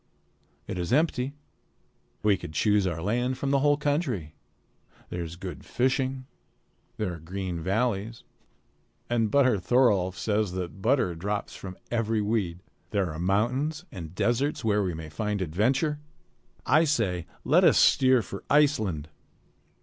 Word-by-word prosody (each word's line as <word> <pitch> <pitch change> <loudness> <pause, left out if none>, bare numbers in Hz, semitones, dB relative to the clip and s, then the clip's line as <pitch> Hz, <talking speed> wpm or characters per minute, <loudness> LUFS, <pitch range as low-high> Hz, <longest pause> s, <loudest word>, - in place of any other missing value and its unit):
It 90 - -5
is 85 - -3
empty. 140 -1 +1 0.9
We 105 -2 +4
could 80 -4 -8
choose 105 +2 +2
our 85 -2 -3
land 120 +5 0
from 135 +1 -2
the 140 - +3
whole 145 +1 +3
country. 145 - -1 0.8
There 90 - -4
is 85 0 -7
good 90 +1 -7
fishing. 130 +1 0 0.7
There 100 -5 -2
are 85 - -8
green 90 +1 -4
valleys. 110 +4 -1 0.9
And 115 -2 +2
Butter 130 -4 +3
Thorolf 95 -4 +2
says 105 -2 0
that 95 +1 -5
butter 115 -5 +2
drops 100 +5 -3
from 95 -1 -8
every 115 -2 0
weed. 100 -5 -1 0.3
There 100 -5 0
are 75 - -6
mountains 130 - 0
and 85 -2 -8
deserts 125 +5 0
where 105 -1 +3
we 90 -4 -1
may 80 -1 -7
find 105 +4 -2
adventure. 125 - 0 0.7
I 155 +2 +5
say, 95 - 0 0.2
let - - +4
us - - +6
steer 130 -3 +5
for 100 +1 -8
Iceland!" 110 - +2
105 Hz, 140 wpm, -27 LUFS, 90-130 Hz, 0.9 s, us